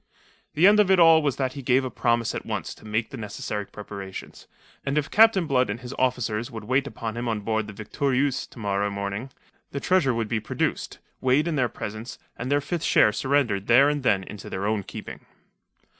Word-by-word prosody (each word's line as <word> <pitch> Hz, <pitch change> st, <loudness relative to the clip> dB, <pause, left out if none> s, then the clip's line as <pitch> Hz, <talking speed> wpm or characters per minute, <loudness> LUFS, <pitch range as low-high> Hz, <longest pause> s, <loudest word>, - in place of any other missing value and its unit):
The 160 Hz, +4 st, +4 dB
end 210 Hz, +2 st, +7 dB
of 205 Hz, -3 st, +4 dB
it 190 Hz, -1 st, +5 dB
all 165 Hz, -1 st, +7 dB
was 145 Hz, -4 st, 0 dB
that 130 Hz, -2 st, -2 dB
he 140 Hz, -, -7 dB
gave 130 Hz, +1 st, +2 dB
a 130 Hz, -, -4 dB
promise 115 Hz, -1 st, +1 dB
at -, -, -4 dB
once -, -, -4 dB
to -, -, -17 dB
make 110 Hz, +2 st, -1 dB
the 135 Hz, -, -7 dB
necessary 105 Hz, -1 st, -5 dB
preparations, 100 Hz, -2 st, -9 dB, 0.4 s
and 140 Hz, +1 st, -1 dB
if 150 Hz, -1 st, -1 dB
Captain 220 Hz, -5 st, +5 dB
Blood 130 Hz, -5 st, +2 dB
and 105 Hz, +4 st, -3 dB
his 125 Hz, +2 st, -7 dB
officers 125 Hz, -2 st, 0 dB
would 115 Hz, -4 st, -8 dB
wait 130 Hz, +5 st, +1 dB
upon 115 Hz, -5 st, -5 dB
him 120 Hz, +1 st, -3 dB
on 110 Hz, -2 st, -1 dB
board 110 Hz, 0 st, -1 dB
the 110 Hz, -, -8 dB
Victorieuse 135 Hz, +2 st, 0 dB
to -, -, -18 dB
morrow 100 Hz, -2 st, -1 dB
morning, 100 Hz, +5 st, -4 dB, 0.4 s
the 140 Hz, -, -4 dB
treasure 140 Hz, -8 st, +2 dB
should 115 Hz, -2 st, -1 dB
be 115 Hz, 0 st, -1 dB
produced, 110 Hz, -, -3 dB, 0.2 s
weighed 130 Hz, +5 st, +2 dB
in 165 Hz, -, -1 dB
their 125 Hz, -4 st, +1 dB
presence, 110 Hz, +3 st, -7 dB, 0.2 s
and 125 Hz, +3 st, -5 dB
their 145 Hz, 0 st, +3 dB
fifth 170 Hz, +3 st, -3 dB
share 105 Hz, -, +5 dB
surrendered 120 Hz, -5 st, 0 dB
there 135 Hz, +4 st, +6 dB
and 145 Hz, -1 st, -1 dB
then 100 Hz, -7 st, +2 dB
into 105 Hz, +1 st, -9 dB
their 95 Hz, +1 st, -3 dB
own 105 Hz, 0 st, 0 dB
keeping. -, -, -9 dB
125 Hz, 215 wpm, -25 LUFS, 105-140 Hz, 0.4 s, end